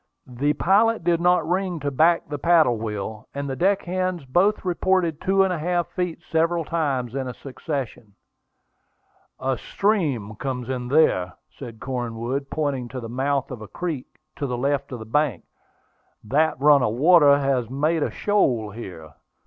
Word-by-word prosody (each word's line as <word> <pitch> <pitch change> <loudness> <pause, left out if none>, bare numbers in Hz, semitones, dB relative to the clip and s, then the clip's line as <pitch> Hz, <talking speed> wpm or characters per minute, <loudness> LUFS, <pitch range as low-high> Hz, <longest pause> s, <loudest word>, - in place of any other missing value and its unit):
The 135 +4 -1
pilot 215 +4 +2
did 170 0 +2
not 175 -2 +3
ring 180 -1 -1
to 145 0 -2
back 165 +5 +3
the 145 -1 -5
paddle 155 -8 +4
wheel, 110 0 -5
and 140 0 -3
the 135 - -3
deck 190 +6 +1
hands 185 -3 -2
both 190 +11 +2
reported 180 -3 0
two 195 +1 +2
feet - - +6
and 190 -1 +1
a 170 - -3
half, 175 +2 -1 0.4
several 165 0 +1
times 135 -8 -1
in 130 -2 -3
succession. 130 -6 -6 1.2
"A 130 -2 -1
stream 145 - -1
comes 125 -2 -4
in 125 -2 -3
there," 125 - +2 0.2
said 115 -2 -10
Cornwood, 125 +1 -4
pointing 140 -5 -2
to 130 +1 -6
the 115 -2 -7
mouth 135 +3 -1
of 125 -4 -7
a 110 - -8
creek 160 - -4 0.3
on 140 - -1
the 125 - -2
left 140 +2 -1 0.2
bank; 150 -3 +1 0.8
"that 145 +6 +1
run 145 0 +6
of 110 -2 0
water 145 0 +6
has 135 -4 0
made 155 +5 0
a - - 0
shoal 125 - 0
here." 90 -8 -9
140 Hz, 160 wpm, -23 LUFS, 125-170 Hz, 1.2 s, feet